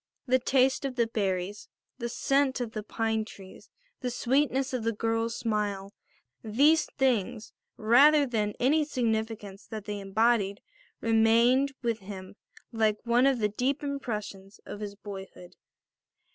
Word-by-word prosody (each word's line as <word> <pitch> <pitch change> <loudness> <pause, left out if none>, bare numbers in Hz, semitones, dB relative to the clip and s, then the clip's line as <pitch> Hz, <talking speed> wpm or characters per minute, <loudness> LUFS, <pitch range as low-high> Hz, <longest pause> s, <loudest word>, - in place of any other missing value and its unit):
The 255 0 +3
taste 260 +1 +2
of 270 -2 -3
the 235 -2 +2
berries, 200 -2 -3 0.3
the 235 -1 -3
scent 275 +2 +1
of 240 -3 -3
the 215 - -4
pine 220 +1 -1
trees, 195 -3 -13 0.3
the 250 - -2
sweetness 265 +2 0
of 250 -3 -2
the 230 - +1
girl's 225 +1 -1
smile, 205 -3 -2 0.5
these 285 +9 +3
things, 230 -6 0 0.2
rather 280 +7 +6
than 215 -5 -1
any 300 +5 +3
significance 220 -7 -3
that 215 -2 -7
they 205 -1 -4
embodied, 200 0 +1 0.4
remained 230 +4 +3
with 230 -2 0
him 190 -1 -9 0.4
like 220 -2 +1
one 240 +3 +4
of 270 -2 +2
the 210 -2 +1
deep 260 +7 -1
impressions 215 -8 -5
of 205 - -8
his 205 -1 -6
boyhood. 195 -3 -10
225 Hz, 140 wpm, -28 LUFS, 210-255 Hz, 0.5 s, rather